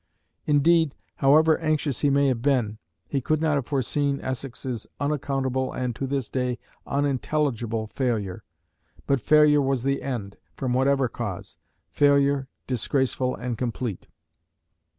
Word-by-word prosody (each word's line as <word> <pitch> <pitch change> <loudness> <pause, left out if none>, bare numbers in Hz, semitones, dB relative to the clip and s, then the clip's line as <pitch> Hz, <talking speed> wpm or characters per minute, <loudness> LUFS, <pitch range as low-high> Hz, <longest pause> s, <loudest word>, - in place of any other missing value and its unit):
Indeed, 155 +1 +4 0.2
however 155 +3 +5
anxious 155 -4 0
he 145 - +2
may 140 0 +3
have 120 -3 -1
been, 120 -6 +1 0.3
he 140 - -1
could 155 +4 +1
not 155 -1 +1
have 140 -4 -1
foreseen 140 +1 0
Essex's 130 -2 -5
unaccountable 135 -3 -1
and 125 -2 -2
to 135 - -3
this 135 -3 -1
day 125 -2 -1 0.3
unintelligible 135 -5 -1
failure. 110 -4 -2 0.6
But 140 -3 +1
failure 150 -1 +5
was 135 -3 0
the 140 +1 0
end, 110 -7 -4 0.2
from 130 -2 -2
whatever 135 +1 +3
cause; 110 -6 -6 0.4
failure, 140 -1 +3 0.2
disgraceful 130 0 0
and 120 -2 -4
complete. 120 -4 -3
135 Hz, 130 wpm, -25 LUFS, 125-145 Hz, 0.6 s, however